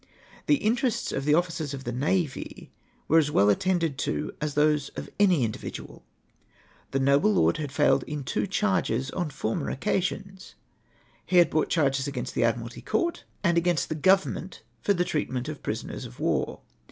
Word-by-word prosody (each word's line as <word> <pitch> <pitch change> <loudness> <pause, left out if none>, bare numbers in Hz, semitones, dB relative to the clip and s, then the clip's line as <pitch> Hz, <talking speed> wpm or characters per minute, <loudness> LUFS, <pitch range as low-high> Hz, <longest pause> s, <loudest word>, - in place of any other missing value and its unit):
The 295 - +6
interests 235 -1 0
of 135 - -3
the 150 0 +4
officers 165 -4 -1
of 135 - -8
the 120 - -3
navy 145 +4 -2 0.4
were 165 - +5
as 150 -2 +1
well 105 -7 +4
attended 165 - 0
to 150 - -2
as 150 -1 -2
those 150 -1 +2
of - - -7
any 185 -9 +4
individual. 110 -2 -6 0.9
The 135 - -1
nolde 140 +6 +3
lord 180 - +3
had 150 -3 -4
foiled 135 -1 +3
in 150 -2 -4
two 130 - -1
charges 185 - 0
on 175 -4 -2
former 115 -5 -2
occasions. 190 +3 -3 0.7
He 180 - +1
had 170 -2 +6
brought 155 - +1
charges 140 -4 +1
against 130 -3 -4
the - - +1
Admiralty 115 0 -1
Court, 345 -1 -1 0.2
and 170 -2 +4
against 170 -4 0
the - - -1 0.2
Government 190 -3 -1 0.2
for 200 - +2
tlie 175 0 +1
treatment 130 -5 -2
of 155 -1 -5
the - - -30
prisoners - - -4
of - - -12
war. - - -1
150 Hz, 175 wpm, -27 LUFS, 135-180 Hz, 0.9 s, The